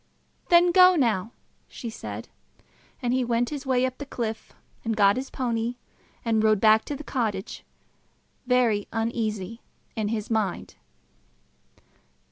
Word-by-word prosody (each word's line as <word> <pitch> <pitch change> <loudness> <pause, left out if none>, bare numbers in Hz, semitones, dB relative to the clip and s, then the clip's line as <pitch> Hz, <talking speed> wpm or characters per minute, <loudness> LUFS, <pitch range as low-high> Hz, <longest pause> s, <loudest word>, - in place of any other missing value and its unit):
"Then 345 0 +6
go 365 +1 +7
now," 230 - +1 0.4
she 235 -3 -7
said. - - -7 0.8
And 245 0 +1
he 260 0 +2
went 240 +1 0
his 280 -2 -6
way 255 -1 +2
up 255 -1 -4
the 285 - -5
cliff, 225 -4 -4 0.3
and 225 -1 -2
got 200 -1 +5
his 260 +2 -4
pony, 235 -1 -2 0.5
and 220 -1 +2
rode 215 -2 +4
back 220 +1 +5
to 290 - -4
the 295 - -8
cottage, 215 -9 -3 0.8
very 240 -5 +2
uneasy 225 -2 -2 0.3
in 215 -2 -1
his 215 0 -3
mind. 215 -5 -1
230 Hz, 135 wpm, -26 LUFS, 220-255 Hz, 0.8 s, go